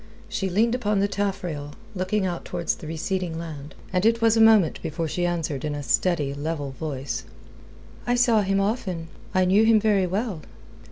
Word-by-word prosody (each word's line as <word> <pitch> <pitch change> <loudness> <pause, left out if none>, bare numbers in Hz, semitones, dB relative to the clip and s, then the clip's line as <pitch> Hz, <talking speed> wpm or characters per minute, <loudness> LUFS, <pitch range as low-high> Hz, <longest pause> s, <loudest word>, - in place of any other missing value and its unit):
She 195 - -2
leaned 220 +6 +2
upon 210 -5 +1
the 200 - +2
taffrail, 180 -8 -3 0.2
looking 190 +1 0
out 175 -2 -3
towards 175 -1 -2
the 155 - -9
receding 165 +1 -2
land, 155 -3 -7 0.2
and 180 0 +2
it 230 +1 +4
was 225 -1 +4
a 225 - +4
moment 220 -7 +5
before 165 0 -3
she 175 +3 -1
answered 160 -5 -2
in 150 -1 -2
a 145 - -5
steady, 140 +4 +1
level 145 -1 -3
voice: 135 -4 -4 0.8
"I 245 - +3
saw 240 -3 +4
him 195 0 +1
often. 195 -6 -2 0.3
I 185 0 +4
knew 195 +4 +4
him 220 -1 +5
very 205 -3 +2
well." 195 -2 -2
180 Hz, 180 wpm, -25 LUFS, 155-210 Hz, 0.8 s, moment